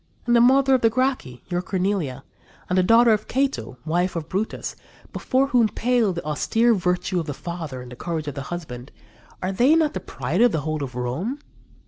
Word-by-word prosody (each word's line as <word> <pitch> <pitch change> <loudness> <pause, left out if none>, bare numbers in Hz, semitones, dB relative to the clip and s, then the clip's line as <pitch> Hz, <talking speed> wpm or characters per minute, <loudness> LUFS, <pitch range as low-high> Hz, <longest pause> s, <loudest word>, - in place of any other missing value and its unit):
And 240 -1 +3
the 235 - +6
mother 265 +2 +5
of 260 - +3
the 225 - +5
Gracchi, 250 - -1
your 175 -1 -1
Cornelia, 180 -8 -2 0.4
and 180 - -1
the 185 - +4
daughter 230 +5 +5
of 215 - -2
Cato, 270 - -1
wife 175 +3 0
of 160 -2 -4
Brutus, 195 +5 -3 0.4
before 270 +1 +1
whom 235 -4 +3
pale 240 -3 +1
the 170 -3 -5
austere 225 +10 +2
virtue 180 -1 0
of 165 - -4
the 145 - -4
father 160 -7 -6
and 125 - -12
the - - -8
courage 160 +2 -4
of 145 - -3
the 140 - -5
husband 145 -7 -7 0.5
are 185 - 0
they 245 +11 +4
not 315 -2 +2
the - - -3
pride 150 - -3
of 245 -2 +5
the 160 - 0
whole 155 0 -3
of 125 -3 -7
Rome? 135 - -3
180 Hz, 205 wpm, -23 LUFS, 150-235 Hz, 0.5 s, the